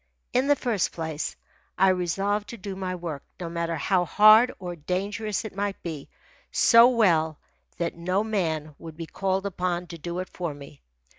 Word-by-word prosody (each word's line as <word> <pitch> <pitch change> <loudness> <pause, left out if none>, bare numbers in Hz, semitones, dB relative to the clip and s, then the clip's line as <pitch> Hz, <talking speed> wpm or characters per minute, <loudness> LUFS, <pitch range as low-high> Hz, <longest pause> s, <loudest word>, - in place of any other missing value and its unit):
In 255 +2 +2
the 290 - +5
first 230 -8 -1
place, 160 -2 -4 0.4
I 190 +1 +5
resolved 195 +3 0
to 235 - -7
do 195 -1 -6
my 185 -1 -3
work, 165 -5 -5 0.2
no 170 -2 -4
matter 170 0 -2
how 180 +4 +1
hard 215 +8 +6
or 180 -2 -6
dangerous 200 +7 -3
it 210 - -7
might 200 0 -2
be, 155 -5 -6 0.4
so 230 +1 +7
well 165 - +2 0.4
that 170 0 -1
no 185 +4 -1
man 160 -8 -2
would 160 -2 -10
be 165 - -5
called 190 +3 -2
upon 180 -2 -2
to 170 -1 -10
do 170 +3 -5
it 185 0 -4
for 170 -5 -4
me. 145 0 -13
180 Hz, 175 wpm, -26 LUFS, 165-205 Hz, 0.4 s, so